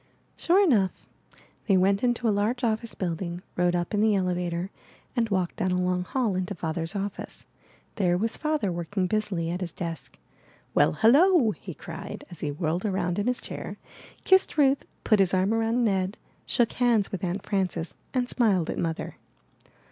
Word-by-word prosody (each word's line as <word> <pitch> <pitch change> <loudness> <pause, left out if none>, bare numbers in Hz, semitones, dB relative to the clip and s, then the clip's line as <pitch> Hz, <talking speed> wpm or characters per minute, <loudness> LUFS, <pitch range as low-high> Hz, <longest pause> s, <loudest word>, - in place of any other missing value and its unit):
'' - - -40
Sure 370 +4 +3
enough. 215 - +1 0.6
They 195 -3 +5
went 195 +2 +3
into 240 -1 +1
a 215 - +3
large 220 +5 0
office 225 -2 -1
build 175 -2 -3
ing, 175 0 -5
rode 175 0 +2
up 175 +4 -2
in 205 - +2
the 215 -1 +4
elevator, 180 -1 -1 0.4
and 230 -2 +1
walked 185 -3 -1
down 185 - 0
a 180 0 +1
long 180 0 0
hall 235 -6 0
into 185 +2 -2
Father's 165 +2 -3
office. 200 0 -5 0.5
There 180 -4 +2
was 225 +4 -1
Father 305 -10 -1
working 175 +3 -2
busily 185 -5 -1
at 180 +2 -3
his 175 -2 -3
desk. 165 -4 -6 0.6
'Well, - - +4
hello!" 270 - +5
he - - -9
cried - - -8
as 175 - -10
he 150 - -2
whirled 160 +4 -2
round 185 -3 -1
in 205 - -1
his 250 0 0
chair, - - -6 0.5
kissed 380 -3 +3
Ruth, 275 -2 +3 0.2
put 215 -3 +3
his 190 -1 +3
arm 190 +3 +2
around 225 +2 +1
Ned, 195 0 0 0.3
shook 240 -2 +2
hands 235 -5 +2
with 190 - -5
Aunt 185 +2 -2
Frances, 180 -4 -2 0.2
and 250 -2 0
smiled 200 -10 +1
at - - -4
Mother. 165 -1 -3
195 Hz, 180 wpm, -27 LUFS, 180-225 Hz, 0.6 s, They